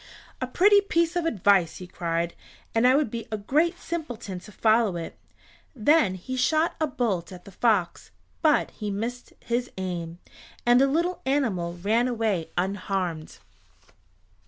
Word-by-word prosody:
"A 255 - -1
pretty 405 +9 +5
piece 340 -3 0
of 350 -2 0
advice," 195 - +2
he 180 - -8
cried, 170 -1 -2 0.4
"and 225 +2 +4
I 255 - +5
would 285 -6 +1
be 230 -1 -5
a 215 - -1
great 310 - +1
simpleton 240 - -5
to 210 - -14
follow 220 -2 +2
it." 165 -1 -6 0.6
Then 235 - +3
he 220 +8 -6
shot 310 +6 +2
a 310 - +2
bolt 210 - -2
at 180 -1 -11
the 200 - -11
fox, 200 -3 0 0.3
but 310 -3 +3
he 210 -2 -5
missed 230 +5 -4
his 240 +1 -2
aim, 175 -3 -4 0.5
and 240 +1 +5
the 275 - +5
little 340 +6 0
animal 195 -12 0
ran 220 +7 +1
away 220 -8 -1
unharmed. 185 -3 -2
225 Hz, 155 wpm, -26 LUFS, 185-275 Hz, 0.6 s, pretty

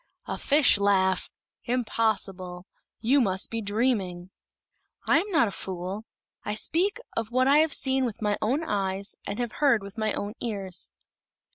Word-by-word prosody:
"A - - -3
fish 285 -7 +5
laugh! 190 -2 +2 0.4
Impossible! 205 -7 -1 0.4
You 265 +5 +4
must 190 -4 0
be 230 0 -2
dreaming." 200 -5 -1 0.7
"I - - +5
am 400 +5 -4
not 320 - +3
a - - -4
fool. 190 +3 -5 0.4
I 210 - -3
speak 375 - 0 0.2
of 225 -1 -2
what 255 +2 +2
I 285 +2 +6
have 315 -2 +4
seen 265 0 +2
with 235 -4 -3
my 210 -1 +1
own 265 +9 +1
eyes 200 -6 -1
and 200 - -3
have 240 -2 -2
heard 265 -8 +4
with 200 +3 -9
my 215 0 +1
own 205 +1 -4
ears." 195 -6 -3
215 Hz, 160 wpm, -27 LUFS, 195-255 Hz, 0.7 s, I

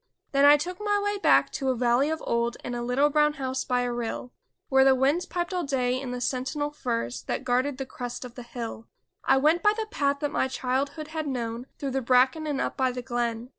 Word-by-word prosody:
Then 275 0 +4
I 290 +1 +8
took 355 +5 -5
my 415 -1 +1
way 410 0 -1
back - - +4
to 270 -2 -2
a 260 - +1
valley 245 +4 +2
of 320 0 -3
old 235 0 0
And 245 - -4
a 240 - -3
little 260 +5 +2
brown 300 0 +3
house 260 -2 -3
by 250 -1 0
a 245 -1 -1
rill. 240 +1 -4 0.3
Where 265 0 +5
the 265 0 +6
winds 280 +7 +1
piped 350 +1 -3
all 360 -1 -1
day 260 -3 0
in 265 - -5
the 250 0 -4
sentinel 270 +4 -2
firs 115 - -3
That - - -3
guarded 255 +2 0
the 270 - -4
crest 250 -1 -6
of 245 - -10
the 245 - -9
hill; 235 -2 -7 0.4
I - - +5
went 310 +6 +3
by 420 0 +4
the 445 - -1
path 280 -5 +1
that 290 -1 -1
my 265 - +1
childhood 275 +4 -2
had 315 -1 -3
known 240 -2 -3
Through 275 -2 -3
the 265 +1 -1
bracken 260 +5 +3
and 285 -2 -1
up - - -2
by 260 -1 +1
the 250 0 -6
glen. 240 -1 -2
265 Hz, 240 wpm, -27 LUFS, 245-295 Hz, 0.4 s, I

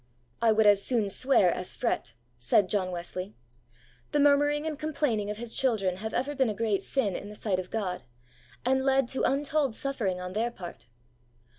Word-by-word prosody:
' 120 - -40
I 230 -1 +5
would 220 0 +3
as 205 -1 +5
soon 225 -5 +1
swear 255 -7 +4
as 180 +1 -4
fret,' 235 - -2 0.2
said 120 - +3
John 190 -3 0
Wesley. 180 +2 -5 0.8
The 295 - +3
murmuring 290 +1 +3
and 305 -2 -4
complaining 280 -9 -1
of 210 - -4
His 230 0 -5
children 205 -8 +1
have 220 +3 -5
ever 270 +4 -1
been 265 -4 +1
a 210 - -3
great 210 -2 0
sin 210 -9 0
in 205 - -6
the 210 - -10
sight 200 -3 -1
of 180 -1 -6
God, 190 -5 -3 0.6
and 265 +1 +2
led 270 -1 +3
to 265 - -1
untold 280 -2 +1
suffering 220 -10 -1
on 180 0 -6
their 225 +4 0
part. 180 - -10
220 Hz, 190 wpm, -28 LUFS, 195-270 Hz, 0.8 s, I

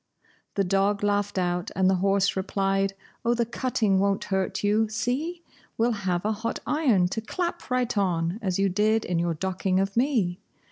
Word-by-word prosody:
The 200 - +2
dog 195 +2 +1
laughed 205 -1 0
out, 175 -1 0
and 190 0 +3
the 190 0 +3
horse 195 0 +2
replied, 195 0 0 0.3
"Oh, 235 +1 +2
the 235 0 +1
cutting 225 -5 0
won't 200 0 +1
hurt 190 +1 -1
you, 215 +2 +2
see? 295 +10 -2 0.3
We'll 235 +2 +2
have 190 -4 -1
a 215 - +2
hot 220 +2 -3
iron 245 - +3
to 220 - -3
clap 345 +8 -4
right 250 -2 0
on, 180 -1 0
as 185 -4 -1
you 195 0 +3
did 215 +4 +2
in 175 -1 0
your 170 -1 0
docking 185 +2 0
of 195 0 -1
me! 230 -9 +1
200 Hz, 180 wpm, -26 LUFS, 190-225 Hz, 0.3 s, and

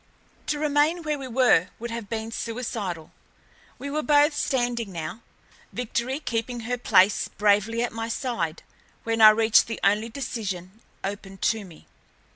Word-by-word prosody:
To 300 - 0
remain 300 +3 +1
where 300 -2 -2
we 265 - -6
were 240 -8 +4
would 235 +1 -6
have 230 -3 -6
been 225 0 -4
suicidal. 225 -9 -4 0.7
We 280 - -6
were 305 +1 0
both 295 0 +4
standing 240 -6 -1
now, 165 +6 -6 0.5
Victory 250 +3 -2
keeping 235 -3 -3
her 245 +2 -3
place 195 -3 +4
bravely 210 +3 +1
at 240 - -3
my 225 0 -4
side, 230 - -3 0.4
when 225 0 0
I 215 - +11
reached 220 0 +4
the 230 - -5
only 210 +3 +2
decision 220 -6 -5 0.2
open 195 -1 -5 0.2
to 220 -2 -7
me. 170 -4 -15
230 Hz, 150 wpm, -25 LUFS, 205-255 Hz, 0.7 s, I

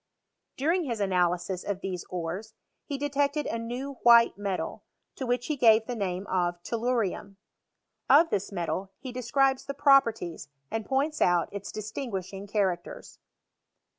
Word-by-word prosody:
During 330 +6 +1
his 235 -5 -3
analysis 180 -1 0
of 195 -1 -3
these 185 -2 -4
ores, 180 +5 -5 0.3
he 285 -3 -3
detected 285 +1 0
a 230 - -2
new 250 +4 -5
white 235 -1 +7
metal, 200 -2 -4 0.3
to 260 - -5
which 245 0 0
he 305 - -1
gave 225 -4 +5
the 245 - -4
name 190 -3 -2
of 175 -2 0
tellurium. 225 -4 -1 0.7
Of 325 +3 +6
this 200 +1 -1
metal 190 +1 -3
he 260 - -7
describes 260 +2 +1
the 280 - -4
properties, 230 - +3 0.2
and 225 -1 -3
points 285 +3 0
out 175 -2 +3
its 200 -1 -6
distinguishing 200 -3 -5
characters. 190 -4 -2
220 Hz, 140 wpm, -28 LUFS, 190-265 Hz, 0.7 s, white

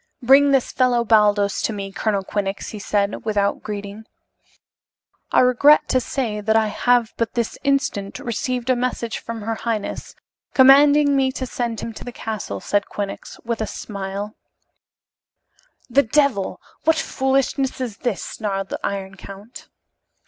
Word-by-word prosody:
"Bring 275 +3 +6
this 270 -2 +2
fellow 250 -2 +2
Baldos 210 -3 +3
to - - 0
me, 200 -2 -5
Colonel 200 0 -1
Quinnox," 195 0 -3
he 215 - -7
said, 205 0 -1
without 205 -2 0
greeting. 205 0 -7 1.3
"I - - +5
regret 255 +4 +5
to 255 - +3
say 235 -5 -3
that 220 +1 +1
I 220 -1 +3
have 240 +2 +2
but 230 +1 -2
this 235 -2 -1
instant 275 -8 0
received 245 +1 -2
a - - +3
message 240 -2 -2
from 230 -2 -7
her 225 +2 -2
highness, 225 -2 -4 0.4
commanding 285 +2 +6
me 265 -1 +2
to 260 - -4
send 235 -2 -3
him 230 - -5
to - - -9
the 245 - -7
castle," 215 - -5
said 205 - 0
Quinnox, 200 -1 -6
with 230 -1 -2
a 220 - -1
smile. 200 0 -6 1.5
"The 270 +3 +4
devil! 245 -5 +1 0.2
What 320 0 +4
foolishness 270 -3 0
is 240 -5 -4
this?" 240 -7 -2
snarled 195 -3 -4
the - - -4
Iron 195 -1 -3
Count. 200 +5 -11
225 Hz, 150 wpm, -21 LUFS, 205-255 Hz, 1.5 s, Bring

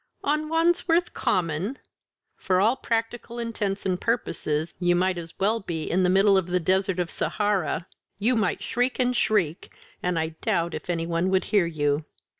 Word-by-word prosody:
on 305 +1 0
Wandsworth 335 +1 +2
Common!" 180 - -1 0.6
"For 185 -1 +1
all 220 +6 +4
practical 230 0 -3
intents 215 -4 -3
and 185 -2 0
purposes 160 -9 -1
you 175 -1 +3
might 180 0 +1
as 165 -1 -10
well 215 +4 +1
be 165 -5 -4
in 185 +4 0
the 180 - +3
middle 195 +1 +5
of 185 -2 0
the 180 0 +1
Desert 190 +2 +1
of 175 -1 -1
Sahara; 200 -6 -1 0.3
you 230 +5 +2
might 220 -2 0
shriek 245 +2 0
and 250 -1 +1
shriek 195 -9 0 0.3
and 180 -1 0
I 160 0 0
doubt 170 0 0
if - - -7
any 165 -1 0
one 170 +2 0
would 190 0 +2
hear 200 -5 +2
you. 145 -2 0
190 Hz, 175 wpm, -25 LUFS, 170-230 Hz, 0.6 s, middle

